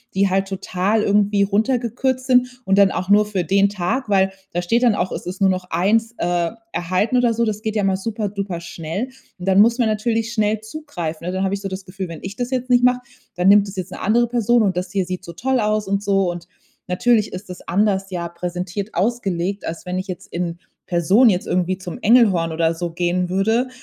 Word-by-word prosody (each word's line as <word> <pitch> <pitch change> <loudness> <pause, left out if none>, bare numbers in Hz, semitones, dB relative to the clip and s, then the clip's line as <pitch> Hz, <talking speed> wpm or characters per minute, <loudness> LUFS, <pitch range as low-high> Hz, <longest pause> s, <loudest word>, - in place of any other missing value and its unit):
die 195 0 +3
halt 195 +1 +1
total 195 +2 0
irgendwie 200 0 +3
runtergekürzt 245 +4 0
sind 250 -1 +2
und 195 0 +2
dann 195 -1 +6
auch 185 - -3
nur 210 +1 +5
für 195 -4 -2
den 200 +4 +3
Tag, 210 +6 -2
weil 190 -1 +3 0.2
da 175 - 0
steht 230 +8 +1
dann 235 -4 +4
auch, 185 -2 -1
es - - -6
ist 185 +1 -5
nur 195 - +5
noch 185 -1 -4
1 220 +7 +1
äh, 175 -1 0 0.2
erhalten 185 +8 0
oder 245 -2 +3
so. 235 +1 +1
Das 215 -1 -2
geht 220 0 -3
ja 205 - +1
mal 190 -1 +2
superduper 200 -3 -3
schnell. 170 +6 -4 0.3
Und 180 - -7
dann 195 +1 +6
muss 235 +2 +4
man 235 - +3
natürlich 225 +1 -1
schnell 215 -1 +1
zugreifen, 210 - -6
ne? 180 - -1
Dann 190 +1 0
habe 190 - -1
ich 200 - -7
so 195 - -4
das 190 0 -6
Gefühl: 185 -1 -6
„Wenn 165 - -8
ich 195 +1 -6
das 245 +1 -3
jetzt 255 -1 -2
nicht 245 -1 +4
mache, 250 0 +4 0.4
dann 180 +1 +1
nimmt 205 0 +6
das 195 - -10
jetzt 185 -1 -4
'ne - - -8
andere 235 +4 +3
Person 235 0 +2
und 190 -3 +1
das 180 0 -3
hier 195 -2 0
sieht 185 0 -5
so 170 - -7
toll 255 +8 0
aus“ 215 -1 0
und 200 +1 -1
so. 195 -2 +2
Und 175 0 -8 0.4
natürlich 215 +4 +2
ist 185 +2 -8
das 180 - -10
anders 195 +1 +1
ja 175 -2 -3
präsentiert 180 +3 -4
ausgelegt, 195 -4 -1
als 165 - -6
wenn 180 - -2
ich 185 - -5
jetzt 185 0 -7
in 170 0 -3 0.3
Person 185 +8 +4
jetzt 180 - -2
irgendwie 185 +1 0
zum 180 -2 -7
Engelhorn 200 -8 +4
oder 165 0 +1
so 170 0 -4
gehen 175 +1 0
würde, 220 +7 +1
195 Hz, 230 wpm, -20 LUFS, 180-225 Hz, 0.4 s, dann